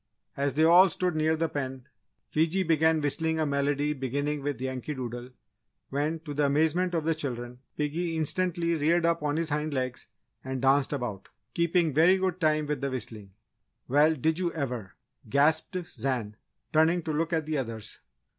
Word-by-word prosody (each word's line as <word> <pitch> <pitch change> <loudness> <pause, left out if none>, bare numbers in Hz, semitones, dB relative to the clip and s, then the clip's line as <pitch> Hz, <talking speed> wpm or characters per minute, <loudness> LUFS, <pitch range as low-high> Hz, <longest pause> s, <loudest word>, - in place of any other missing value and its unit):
As 140 -1 -1
they 155 - +3
all 175 +4 +7
stood 180 -1 -1
near 155 +1 +2
the 165 +1 0
pen, 130 -3 -5 0.4
Fiji 165 +5 +2
began 160 -1 +3
whistling 160 +2 0
a 155 - +2
medley 145 +1 0
beginning 145 +2 -2
with 140 -3 -3
Yankee 130 +3 -4
Doodle, 120 -1 -6 0.6
when, 150 +4 -1
to 150 -3 -7
the 145 0 +2
amazement 160 +5 +1
of 165 - 0
the 165 +1 +2
children, 125 -5 -5 0.2
piggy 160 +3 -1
instantly 170 +1 +1
reared 165 +2 +2
up 170 -1 +1
on 150 0 -1
his 165 -1 -1
hind 150 0 -1
legs 130 -1 -3 0.4
and 130 0 -4
danced 135 +1 +3
about, 120 -9 -4 0.2
keeping 170 -1 +2
very 165 +6 +5
good 185 -1 -2
time 155 -1 +2
with 145 -2 -3
the 140 - -1
whistling. 110 -6 -7 0.5
"Well, 150 +4 +4
did 160 +4 0
you 175 -2 0
ever!" 125 - -4 0.3
gasped 155 +7 +2
Zan, 125 -10 -3 0.4
turning 160 +2 +3
to 155 - -3
look 165 +3 -1
at 160 -2 0
the 155 -2 -1
others. 115 -4 -5
150 Hz, 175 wpm, -28 LUFS, 135-160 Hz, 0.6 s, all